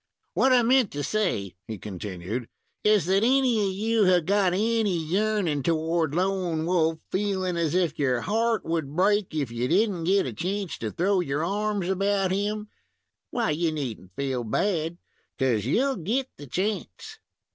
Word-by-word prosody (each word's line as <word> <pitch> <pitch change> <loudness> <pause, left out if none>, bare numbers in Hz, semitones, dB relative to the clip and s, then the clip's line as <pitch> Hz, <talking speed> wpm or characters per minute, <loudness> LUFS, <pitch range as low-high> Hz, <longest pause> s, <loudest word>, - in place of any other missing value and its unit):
"What 265 - +3
I 250 -2 +5
meant 250 -2 +4
to 145 0 -3
say," 175 - -1
he 110 - -5
continued, 100 +3 -5 0.3
"is 210 -5 +4
that 190 +3 +2
any 250 -3 +3
of - - -1
you 220 +2 +1
have 180 -3 +4
got 195 0 +3
any 215 -1 +1
yearnin' 180 -2 0
toward 160 0 0
Lone 180 -3 0
Wolf, 165 -2 +2
feeling 190 -2 -1
as 170 -1 0
if 170 -5 +1
your 130 -4 +1
heart 225 +1 0
would 160 -3 -2
break 200 -1 +2
if 140 -6 -1
you 120 +1 -1
did 205 - +3
n't 170 -3 -4
get 195 +1 +3
a 125 - -4
chance 190 - -3
to 110 - -3
throw 190 - +1
your 150 -3 -1
arms 205 0 -1
about 195 0 +1
him, 210 +2 -2 0.6
why, 235 -9 0
you 160 +2 0
need 140 -8 -4
n't 95 0 -19
feel 135 -3 -2
bad, 165 - -1 0.4
'cause 120 -5 +1
you'll 265 - +1
get 235 +10 -1
the 145 - -11
chance." 185 - -3
180 Hz, 170 wpm, -26 LUFS, 150-205 Hz, 0.6 s, I